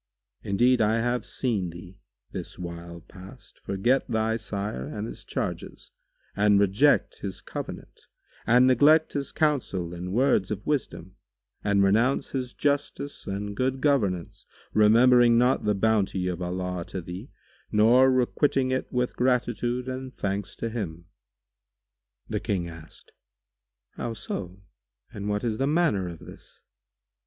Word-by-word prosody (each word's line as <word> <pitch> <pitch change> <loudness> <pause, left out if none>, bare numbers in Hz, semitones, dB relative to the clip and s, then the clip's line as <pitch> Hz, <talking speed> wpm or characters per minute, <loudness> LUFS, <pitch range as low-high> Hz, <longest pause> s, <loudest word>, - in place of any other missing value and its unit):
Indeed, 120 +5 +2
I 110 +1 +3
have 120 +2 -1
seen 105 -9 -1
thee, 90 +3 -12 0.3
this - - -7
while 85 -1 -8
past, 95 +6 -14
forget 120 +8 0
thy 110 0 +1
sire 100 - -4
and 105 +8 -5
his - - -8
charges - - -5 0.4
and 105 0 +4
reject 100 +9 +3
his 95 -2 -5
covenant - - -8 0.4
and 125 +3 +6
neglect 145 +5 +5
his 140 -1 -2
counsel 120 - 0
and 90 +1 -6
words 120 -4 +2
of 105 -1 -4
wisdom 125 - -3 0.5
and 100 -1 +3
renounce 115 +7 +2
his 125 -2 -4
justice 145 0 -2
and 100 +1 -4
good 130 +2 0
governance, 105 - 0 0.3
remembering 120 +2 +6
not 125 0 +2
the 105 -1 +2
bounty 100 -3 +1
of 90 0 -3
Allah 90 0 -3
to 95 - -6
thee 90 +8 -8 0.4
neither 120 +5 +5
requiting 130 +1 +1
it 130 - -2
with 125 0 -1
gratitude 125 0 0
and 130 0 -6
thanks 100 0 -3
to 115 - -3
Him." 85 -8 -5 1.2
The - - -2
King 90 -4 -2
asked, 80 -2 -13 0.8
"How 115 -1 -5
so? 95 -2 -6 0.5
And 100 0 -4
what 105 0 -1
is 110 -2 -1
the 135 - +1
manner 150 - +2
of 85 -1 -7
this?" - - -14
110 Hz, 135 wpm, -26 LUFS, 95-125 Hz, 1.2 s, and